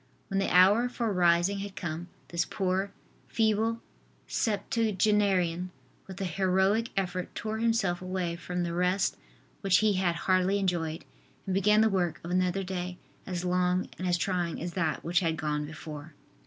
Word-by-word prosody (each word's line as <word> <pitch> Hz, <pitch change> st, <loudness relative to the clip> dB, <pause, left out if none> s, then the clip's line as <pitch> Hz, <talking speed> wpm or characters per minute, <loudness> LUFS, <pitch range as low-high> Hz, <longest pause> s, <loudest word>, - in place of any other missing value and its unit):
When 195 Hz, -, 0 dB
the 195 Hz, -, 0 dB
hour 200 Hz, +7 st, +5 dB
for 235 Hz, -4 st, -2 dB
rising 175 Hz, +2 st, +3 dB
had 200 Hz, 0 st, -6 dB
come, 170 Hz, -3 st, -4 dB, 0.2 s
this 170 Hz, 0 st, 0 dB
poor, 190 Hz, +1 st, -1 dB, 0.4 s
feeble 225 Hz, +1 st, +1 dB, 0.4 s
septuagenarian 200 Hz, -5 st, +1 dB, 0.4 s
with 190 Hz, -1 st, -9 dB
a 195 Hz, -, -1 dB
heroic 190 Hz, +5 st, +1 dB
effort 185 Hz, -1 st, -2 dB
tore 220 Hz, 0 st, -3 dB
himself 225 Hz, -6 st, +1 dB
away 185 Hz, -2 st, -2 dB
from 180 Hz, +1 st, -3 dB
the 170 Hz, -1 st, -2 dB
rest 180 Hz, +2 st, +1 dB, 0.4 s
which 195 Hz, -3 st, +3 dB
he 215 Hz, -1 st, +3 dB
had 185 Hz, -3 st, +1 dB
hardly 185 Hz, +2 st, +2 dB
enjoyed 170 Hz, -4 st, -1 dB, 0.4 s
and 190 Hz, -, -2 dB
began 210 Hz, +3 st, +4 dB
the 220 Hz, -, +5 dB
work 180 Hz, -6 st, 0 dB
of 170 Hz, -, -5 dB
another 185 Hz, +1 st, +1 dB
day 180 Hz, -1 st, -4 dB, 0.3 s
as 180 Hz, -1 st, -3 dB
long 180 Hz, 0 st, +1 dB
and 185 Hz, -, -2 dB
as 175 Hz, 0 st, +2 dB
trying 175 Hz, -2 st, -1 dB
as 170 Hz, +1 st, -4 dB
that 160 Hz, -5 st, -1 dB
which 170 Hz, +1 st, +2 dB
had 165 Hz, -3 st, 0 dB
gone 150 Hz, -1 st, -2 dB
before. 155 Hz, -1 st, -9 dB
185 Hz, 160 wpm, -29 LUFS, 175-200 Hz, 0.4 s, hour